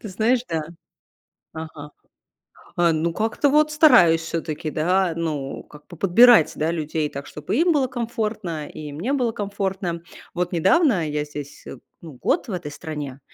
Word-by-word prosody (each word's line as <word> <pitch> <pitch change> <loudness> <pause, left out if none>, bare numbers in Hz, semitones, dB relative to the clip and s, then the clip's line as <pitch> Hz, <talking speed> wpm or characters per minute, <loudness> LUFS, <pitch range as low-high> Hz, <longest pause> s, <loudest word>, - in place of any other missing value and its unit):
Ты 215 - -8
знаешь, 225 +6 +1
да. 160 -2 -1 0.9
Ага. 155 -2 -8 0.8
А, 175 -1 +3
ну, 160 +2 0
как-то 225 - 0
вот 300 +2 +3
стараюсь 180 - +6
всё-таки, 160 -1 -4
да, 180 +3 +1
ну, 150 -5 -4
как 150 0 -17
бы 175 - -12
подбирать 200 +1 +6
да 160 +2 0
людей 155 -2 -2
так, 140 +1 -7
чтоб 150 0 -11
и 260 - +2
им 345 0 +3
было 275 -4 +2
комфортно, 220 - -4
и 150 -1 -8
мне 175 - -3
было 245 -5 +1
комфортно. 195 -4 -3 0.3
Вот 180 0 -1
недавно- 185 - +3
я 150 0 -2
здесь, 145 -1 -9
э, - - -8 0.2
ну, 160 -3 -10
год 265 - -1
в 220 - -6
этой 175 -5 -4
стране, 145 -3 -7
170 Hz, 165 wpm, -22 LUFS, 155-225 Hz, 0.9 s, стараюсь